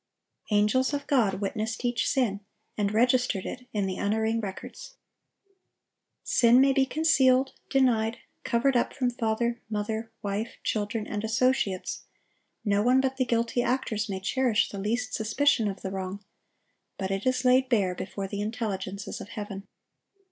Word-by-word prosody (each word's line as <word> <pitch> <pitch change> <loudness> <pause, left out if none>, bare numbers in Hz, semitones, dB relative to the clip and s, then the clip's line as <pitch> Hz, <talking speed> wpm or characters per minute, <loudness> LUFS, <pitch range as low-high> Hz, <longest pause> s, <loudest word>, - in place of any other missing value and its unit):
Angels 220 +7 +2
of 285 - -4
God 225 -9 +2
witnessed 215 +4 -3
each 240 -1 +1
sin, 235 -7 +1 0.4
and 205 -1 0
registered 245 -2 +2
it 250 0 -7
in 205 -2 0
the 190 -1 -3
unerring 220 +2 0
records. 205 - -8 1.3
Sin 240 0 +5
may 270 +1 +5
be 265 0 +2
concealed, 265 -4 +3 0.2
denied, 230 -4 +2 0.3
covered 255 +3 +1
up 240 - +1
from 250 -2 0
father, 235 0 -1
mother, 220 +1 -3
wife, 205 +3 -3
children, 210 +1 -1
and 210 0 -4
associates; 220 -4 0 0.6
no 205 -1 +2
one 250 +4 +4
but 265 0 0
the 255 - +1
guilty 235 0 +1
actors 230 -4 -1
may 190 -1 -3
cherish 230 +2 +1
the 200 - -6
least 225 +5 -2
suspicion 225 +1 +2
of 195 -1 -5
the 190 - -3
wrong; 190 +1 -5 0.7
but 190 0 -3
it 195 +4 -2
is 255 0 +1
laid 255 +1 +4
bare 200 -7 +2
before 195 +2 -5
the 200 +1 -4
intelligences 200 -3 -4
of 205 - -9
heaven. 205 -3 -7
225 Hz, 150 wpm, -27 LUFS, 205-255 Hz, 1.3 s, Sin